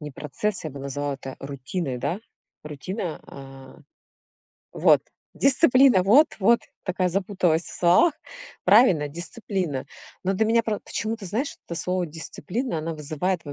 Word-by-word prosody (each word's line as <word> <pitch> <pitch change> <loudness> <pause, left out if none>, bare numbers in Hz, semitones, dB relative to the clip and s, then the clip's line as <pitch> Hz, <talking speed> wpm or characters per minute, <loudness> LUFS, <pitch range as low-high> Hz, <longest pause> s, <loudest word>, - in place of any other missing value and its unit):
Не 150 -1 -7
процесс. 155 +9 -3
Я 155 - -4
бы 140 - -9
назвала 140 +1 -3
это 135 0 -9
рутиной, 140 +1 -4
да? 180 - -2 0.4
Рутина, 160 - -5
а 135 -1 -12 0.9
Вот! - - +4 0.3
Дисциплина. 260 - +5
Вот, 250 +12 +5
вот. 235 +5 +5 0.2
Такая 185 -1 0
запуталась 185 -3 +1
в - - -6
словах. 185 - +5 0.5
Правильно, 190 - +5
дисциплина. 170 - -4 0.4
Но 190 - +1
для 195 +3 +1
меня 230 +1 +3
про 215 -2 -2
почему-то, 220 0 -4
знаешь, 230 - -2
это 170 - -5
слово 180 0 -1
"дисциплина", 170 - -4
она 160 +1 -4
вызывает 155 +4 -2
во 145 - -7
180 Hz, 140 wpm, -24 LUFS, 150-210 Hz, 0.9 s, Дисциплина